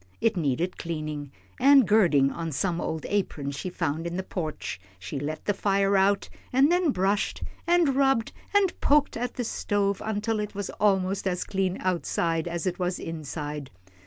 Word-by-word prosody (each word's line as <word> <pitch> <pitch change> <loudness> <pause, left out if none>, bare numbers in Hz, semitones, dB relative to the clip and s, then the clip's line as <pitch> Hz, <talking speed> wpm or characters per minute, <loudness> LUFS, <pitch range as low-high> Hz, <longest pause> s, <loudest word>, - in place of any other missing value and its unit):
It 225 -1 +2
needed 165 +2 -1
cleaning, 155 -4 -4 0.3
and 275 -4 +7
girding 170 -10 +4
on 165 -1 -4
some 175 +4 -1
old 160 -1 -3
aprons 145 -9 -2
she 185 - -4
found 165 -2 -2
in 170 +1 -4
the 190 - -2
porch, 155 - -4 0.2
she 135 +10 -5
let 155 +2 -4
the 205 - +2
fire 195 0 +1
go 200 - +4
out, 195 +1 +3 0.2
and 270 +5 +4
then 355 -2 +3
brushed, 200 -3 0 0.2
and 340 -6 +4
rubbed, 270 -4 +2 0.2
and 405 -3 +3
poked 290 0 +3
at 245 +2 -3
the 245 - -2
stove 205 -3 0
until 220 +1 -1
it 210 -1 -4
was 200 -1 -3
almost 195 -1 +2
as 180 -1 0
clean 190 -1 -1
outside 170 -2 0
as 170 0 -3
it 185 -1 -1
was 180 0 -1
inside. 150 -3 -5
190 Hz, 175 wpm, -27 LUFS, 160-210 Hz, 0.3 s, and